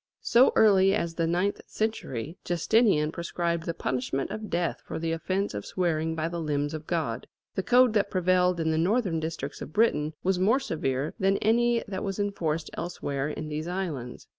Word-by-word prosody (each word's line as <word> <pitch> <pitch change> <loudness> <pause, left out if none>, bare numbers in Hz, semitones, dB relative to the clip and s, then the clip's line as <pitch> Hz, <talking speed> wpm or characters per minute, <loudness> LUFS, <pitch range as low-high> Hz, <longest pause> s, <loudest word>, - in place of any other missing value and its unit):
So 245 +3 +5
early 195 -2 +5
as 170 -5 -2
the 165 0 0
ninth 180 +4 0
century, 165 - -3
Justinian 175 -3 +2
prescribed 170 0 -2
the 165 - -2
punishment 130 +1 -2
of 215 -1 -5
death 170 0 -1
for - - -5
the 165 0 -2
offence 185 - -1
of 105 0 -4
swearing 160 -3 -1
by 160 0 -1
the 170 0 -4
limbs 145 -1 -1
of 155 0 -6
God. 140 -9 -2 0.3
The - - -1
code 250 +2 +4
that 205 -2 +2
prevailed 180 -1 +2
in 160 -1 +1
the 160 - +1
northern 185 -1 +1
districts 155 -3 -5
of 155 - -7
Britain 155 -9 +2
was 185 0 +1
more 220 +8 +4
severe 140 - -2
than 195 +1 +3
any 235 +2 +2
that 190 -2 -4
was 195 -2 -3
enforced 165 -6 -2
elsewhere 145 -5 -3
in 155 0 -5
these 155 +2 -4
islands. 165 -10 -4
170 Hz, 185 wpm, -27 LUFS, 155-195 Hz, 0.3 s, So